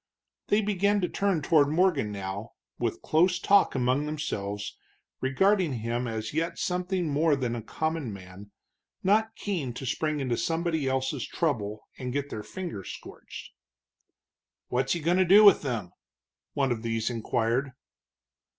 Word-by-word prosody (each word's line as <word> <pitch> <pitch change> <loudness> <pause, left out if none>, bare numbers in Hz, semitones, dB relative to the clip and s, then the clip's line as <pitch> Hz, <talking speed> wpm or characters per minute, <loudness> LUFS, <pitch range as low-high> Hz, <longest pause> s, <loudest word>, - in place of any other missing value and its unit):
They 205 +1 +3
began 205 0 +1
to 180 - +1
turn 195 -6 0
toward 150 -2 +4
Morgan 155 - +2
now, 100 +2 -5 0.3
with 120 -2 -2
close 175 +3 +3
talk 200 -1 +4
among 130 +3 +1
themselves, 105 -9 -4 0.4
regarding 180 +5 +2
him 120 +1 -2 0.3
yet 165 +3 0
as - - -12
something 180 -1 -1
more 150 +1 +2
than 125 -3 -2
a 115 - -4
common 155 +2 -3
man, 95 +1 -11 0.5
not 220 +3 +2
keen 165 - -3
to 135 - -6
spring 155 +3 -1
into 125 -4 -1
somebody 165 -3 0
else's 130 0 -1
trouble 110 -10 -2
and 125 -1 -4
get 145 0 -2
their 110 - -4
fingers 170 - -6
scorched. - - -10 1.2
"What's 125 +1 +1
he 170 - -3
going 170 +4 +2
to 185 - +5
do 195 +4 +7
with 200 -3 +8
them?" 115 - -3 0.6
one 135 -2 +1
of 115 -2 -1
these 115 0 -1
inquired. 115 +3 -1
140 Hz, 150 wpm, -28 LUFS, 115-175 Hz, 1.2 s, with